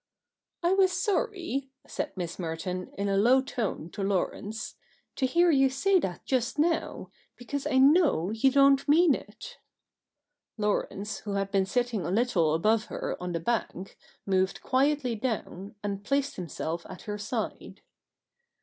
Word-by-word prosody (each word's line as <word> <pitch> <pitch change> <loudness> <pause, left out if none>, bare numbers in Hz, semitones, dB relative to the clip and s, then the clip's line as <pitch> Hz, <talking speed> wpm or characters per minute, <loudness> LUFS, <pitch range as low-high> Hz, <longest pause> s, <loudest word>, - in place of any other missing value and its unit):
' - - -59
I 345 +2 +3
was 380 -1 +4
sorry,' 375 - -1 0.2
said - - -5
Miss 175 -1 -5
Merton 180 +2 -4
in 200 0 -1
a 195 0 +1
low 245 +6 +5
tone 225 - -3
to - - -6
Laurence, 200 +2 -2 0.2
' - - -41
to 260 - +2
hear 345 +6 +4
you 270 -2 +4
say 375 +9 +2
that 180 - -4
just 255 0 0
now, 325 +2 -1 0.2
because 275 +3 -4
I 260 - +1
know 275 - +4
you 225 +5 +3
don't 275 0 +4
mean 315 +1 +5
it.' - - -8 1.0
Laurence, 210 -1 -2
who 205 - -5
had 195 0 -1
been 195 -2 +2
sitting 240 -3 -1
a - - -3
little 185 -7 +2
above 215 +6 +2
her - - -4
on 180 -1 -3
the 165 - -1
bank, 195 -1 -3 0.3
moved 190 -1 0
quietly 270 -1 +1
down, 215 -4 -4
and 200 -1 -3
placed 275 +4 0
himself 170 -1 -4
at 185 - -9
her 210 0 -5
side. 210 +1 -5
225 Hz, 160 wpm, -28 LUFS, 195-275 Hz, 1.0 s, low